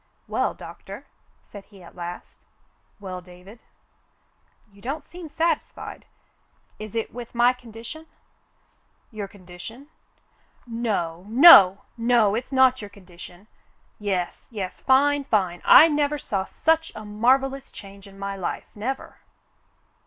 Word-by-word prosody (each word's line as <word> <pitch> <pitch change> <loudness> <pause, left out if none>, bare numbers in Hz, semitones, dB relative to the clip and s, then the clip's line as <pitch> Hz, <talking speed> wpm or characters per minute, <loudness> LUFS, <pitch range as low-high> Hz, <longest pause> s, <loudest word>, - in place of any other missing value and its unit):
"Well, - - -1
Doctor," - - -11 0.4
he - - -36
said 200 -1 -12
at 185 -4 -15
last. 175 0 -8 0.6
"Well, 185 -2 -7
David." 180 +5 -15 1.1
"You 200 - -19
don't 275 +7 -5
seem 345 -2 -10
satisfied. 325 +3 -3 0.7
Is 215 0 -8
it 225 - -3
with 240 -1 -9
my 240 +1 +4
condition?'* 245 +6 -11 1.0
"Your 210 -3 -6
condition 190 +5 -12
.f^ 285 - -20 0.8
No, 205 -8 -3
no, 215 - +8 0.2
no! 230 -3 +3
It's 240 +5 -4
not 260 -1 +4
your 205 - -8
con 200 -2 -18
dition. 175 +1 -13 0.5
Yes, 190 -4 -3
yes 195 -5 -6
— - - -27
fine, 285 +2 +4
fine. 185 -8 0
I 320 - +9
never 295 -1 0
saw 195 -8 -3
such 320 +7 0
a 215 - -8
mar 225 +5 +3
vellous 270 0 -7
change 200 0 -13
in 195 0 -15
my 195 0 -5
life, 190 -3 -5
never 250 +6 -5
215 Hz, 135 wpm, -24 LUFS, 195-260 Hz, 1.1 s, I